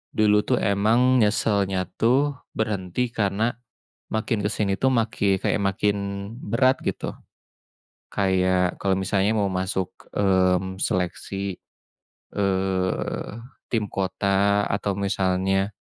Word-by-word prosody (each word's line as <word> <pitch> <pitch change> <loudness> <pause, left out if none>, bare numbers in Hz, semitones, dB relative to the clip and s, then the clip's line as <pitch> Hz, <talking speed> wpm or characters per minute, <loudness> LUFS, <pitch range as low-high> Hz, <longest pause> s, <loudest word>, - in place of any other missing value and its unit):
dulu 105 -1 +4
tuh 125 - +3
emang 115 +6 +3
nyesalnya 100 -3 +2 0.2
tuh 135 +5 +3 0.2
berhenti 110 +2 -1
karena 110 +3 0 0.5
makin 110 -1 -1
ke - - +2
sini 100 -2 0
tuh 130 0 +2
maki 100 -4 +1
kayak - - +1
makin 100 +1 +1 0.5
berat 130 +5 +3
gitu, - - -2 1.0
kayak 95 -2 +1
kalau 95 -1 +1
misalnya 95 +3 +1
mau 100 -2 +1
masuk, 95 0 -2 0.2
mmm, 95 -1 +2
seleksi, 95 +1 -2 0.8
eh, 95 -2 -1 0.4
tim 110 -3 0
kota 100 +1 +1
atau 100 0 -1
misalnya, 95 0 +1
100 Hz, 105 wpm, -24 LUFS, 95-110 Hz, 1.0 s, dulu